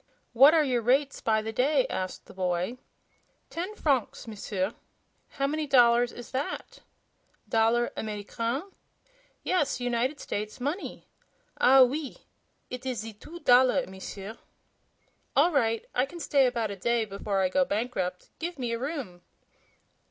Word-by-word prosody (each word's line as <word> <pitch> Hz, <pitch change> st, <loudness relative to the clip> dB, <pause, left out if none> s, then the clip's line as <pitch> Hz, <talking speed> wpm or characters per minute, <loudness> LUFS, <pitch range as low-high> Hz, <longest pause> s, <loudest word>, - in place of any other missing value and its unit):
"What 275 Hz, +7 st, +8 dB
are 315 Hz, -, +5 dB
your 250 Hz, -4 st, +1 dB
rates 270 Hz, +5 st, +1 dB
by 220 Hz, -1 st, +1 dB
the 220 Hz, 0 st, -4 dB
day?" 265 Hz, +2 st, +3 dB
asked 185 Hz, 0 st, -4 dB
the -, -, -14 dB
boy. 185 Hz, +5 st, -2 dB, 0.7 s
"Ten 365 Hz, +6 st, -4 dB
francs, 270 Hz, -, 0 dB
M'sieur." 205 Hz, -1 st, -3 dB, 0.6 s
"How 275 Hz, -, +1 dB
many 305 Hz, +2 st, -1 dB
dollars 240 Hz, -2 st, +5 dB
is 240 Hz, -, -10 dB
that?" 270 Hz, +2 st, -4 dB, 0.7 s
"Dollar 230 Hz, +2 st, +2 dB
Americaine?" 230 Hz, -, -3 dB, 0.8 s
"Yes; 295 Hz, -8 st, +1 dB
United 245 Hz, +3 st, -1 dB
States 215 Hz, +4 st, -4 dB
money." 290 Hz, +10 st, -4 dB, 0.5 s
"Ah, 265 Hz, +1 st, +7 dB
OUI! 275 Hz, +2 st, +1 dB, 0.5 s
Eet 250 Hz, 0 st, -5 dB
is 255 Hz, -4 st, -3 dB
ze 225 Hz, 0 st, -7 dB
two 335 Hz, +11 st, -12 dB
dollar, 255 Hz, +2 st, +5 dB
M'sieur." 195 Hz, +3 st, -8 dB, 1.0 s
"All 320 Hz, +6 st, +5 dB
right; 230 Hz, -6 st, +1 dB
I 250 Hz, +2 st, +1 dB
can 345 Hz, +4 st, -10 dB
stay 280 Hz, -3 st, +3 dB
about 230 Hz, -4 st, -1 dB
a -, -, -4 dB
day 235 Hz, +4 st, 0 dB
before 200 Hz, -1 st, -2 dB
I 185 Hz, -, +2 dB
go 275 Hz, +8 st, +3 dB
bankrupt. 200 Hz, -6 st, -3 dB
Give 345 Hz, +1 st, -4 dB
me 245 Hz, -3 st, -2 dB
a 230 Hz, -, -2 dB
room." 260 Hz, -, -5 dB
245 Hz, 145 wpm, -28 LUFS, 220-275 Hz, 1.0 s, What